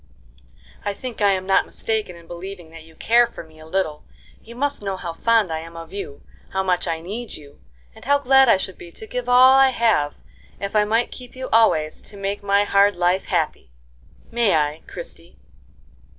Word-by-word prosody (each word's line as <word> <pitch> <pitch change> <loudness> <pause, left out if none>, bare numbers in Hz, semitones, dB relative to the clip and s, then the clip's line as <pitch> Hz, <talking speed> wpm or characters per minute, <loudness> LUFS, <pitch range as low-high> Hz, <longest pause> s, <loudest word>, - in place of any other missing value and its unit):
"I 205 -1 -2
think 250 -1 -7
I 205 - +5
am 185 -1 -3
not 195 - +3
mistaken 220 -5 -3
in 170 -1 -15
believing 175 0 -9
that 165 0 -11
you 160 0 -17
care 235 +5 +4
for 235 - -10
me 160 -1 -19
a 155 - -13
little. 160 -4 -2 0.4
You 235 +1 -12
must 285 +1 -1
know 195 -2 -3
how 170 -2 -5
fond 225 0 +2
I 160 - -2
am 165 +1 -10
of 165 +1 -10
you, 195 -8 -7 0.3
how 190 0 0
much 180 -2 0
I 165 -1 -2
need 215 +7 -6
you, 145 -1 -15 0.3
and - - -15
how 285 +2 +4
glad 270 -2 +5
I 195 - +6
should 190 -1 -6
be 170 - -11
to - - -10
give 250 +2 -4
all 255 +1 +7
I 270 0 +6
have 225 - +1 0.4
if 200 +1 -5
I 210 0 +4
might 225 +3 +1
keep 250 -1 -11
you 260 0 -6
always 160 -9 +3
to 205 - -11
make 200 +1 -3
my 200 0 +2
hard 200 0 +3
life 180 +2 +1
happy. 65 - -2 0.6
May 230 -5 +2
I, 150 0 0
Christie?" - - -9
200 Hz, 205 wpm, -22 LUFS, 170-235 Hz, 0.6 s, all